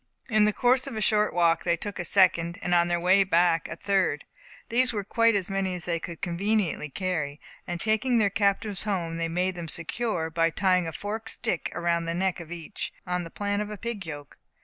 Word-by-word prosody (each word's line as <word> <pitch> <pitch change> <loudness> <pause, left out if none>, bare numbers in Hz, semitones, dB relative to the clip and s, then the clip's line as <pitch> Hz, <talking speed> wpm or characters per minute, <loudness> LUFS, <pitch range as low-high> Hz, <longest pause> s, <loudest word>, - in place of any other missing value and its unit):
In 215 -1 +5
the 210 - +3
course 250 +4 +2
of - - -5
a - - -2
short 210 0 +2
walk 170 -1 +2
they 170 -1 +1
took 205 +3 -5
a 175 - -2
second, 170 -2 +3
and 175 - 0
on 170 0 +4
their 175 0 0
way 185 +3 +5
back, 170 -2 +2
a - - -6
third. 190 -7 0 0.4
These 250 +2 +3
were 210 -3 -3
quite 230 +2 +3
as 195 -3 0
many 195 -2 -1
as 175 - -4
they 170 -1 -1
could 170 -1 -8
conveniently 180 -2 0
carry; 155 -3 -3 0.3
and 175 0 -3
taking 220 +5 +2
their 205 -3 +3
captives 200 0 +1
home, 175 -6 -2
they 165 0 -1
made 180 +3 0
them 175 -2 -6
secure, 170 0 -1
by 165 0 +2
tying 180 0 +2
a - - -3
forked 220 +6 -5
stick 175 - -2
around 170 -1 0
the 165 0 -2
neck 185 0 0
of 170 -1 -10
each, 175 +3 -6
on 180 -1 -1
the 165 - -8
plan 205 +3 -2
of 210 - -4
a 210 - -6
pig 230 -2 -4
yoke. 145 -2 -8
185 Hz, 220 wpm, -27 LUFS, 170-205 Hz, 0.4 s, In